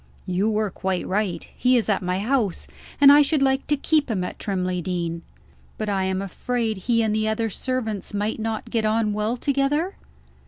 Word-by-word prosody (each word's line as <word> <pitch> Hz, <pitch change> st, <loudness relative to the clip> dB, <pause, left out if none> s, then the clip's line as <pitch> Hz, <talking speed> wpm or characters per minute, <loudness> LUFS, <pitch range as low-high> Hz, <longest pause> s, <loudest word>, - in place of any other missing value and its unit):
"You 185 Hz, +4 st, 0 dB
were 215 Hz, -2 st, 0 dB
quite 190 Hz, 0 st, -2 dB
right. 190 Hz, -4 st, -1 dB
He 250 Hz, 0 st, +3 dB
is 230 Hz, -, 0 dB
at 205 Hz, -2 st, +1 dB
my 180 Hz, 0 st, -1 dB
house 215 Hz, -3 st, 0 dB, 0.3 s
and 280 Hz, 0 st, +9 dB
I 290 Hz, +1 st, +8 dB
should 290 Hz, 0 st, +2 dB
like 265 Hz, 0 st, +1 dB
to 295 Hz, -, +2 dB
keep 300 Hz, 0 st, +1 dB
him 195 Hz, -5 st, -1 dB
at 180 Hz, -, -6 dB
Trimley 185 Hz, -3 st, -1 dB
Deen; 170 Hz, -2 st, -3 dB, 0.6 s
but 215 Hz, -1 st, -3 dB
I 195 Hz, -2 st, 0 dB
am 190 Hz, +1 st, -1 dB
afraid 225 Hz, +3 st, -2 dB
he 230 Hz, +4 st, +1 dB
and 215 Hz, -1 st, +1 dB
the 215 Hz, 0 st, 0 dB
other 220 Hz, 0 st, -1 dB
servants 225 Hz, -5 st, -3 dB
might 205 Hz, +2 st, -2 dB
not 220 Hz, 0 st, -3 dB
get 230 Hz, -2 st, +1 dB
on 215 Hz, 0 st, +1 dB
well 215 Hz, +3 st, -1 dB
together?" 285 Hz, +7 st, 0 dB
215 Hz, 195 wpm, -23 LUFS, 190-250 Hz, 0.6 s, and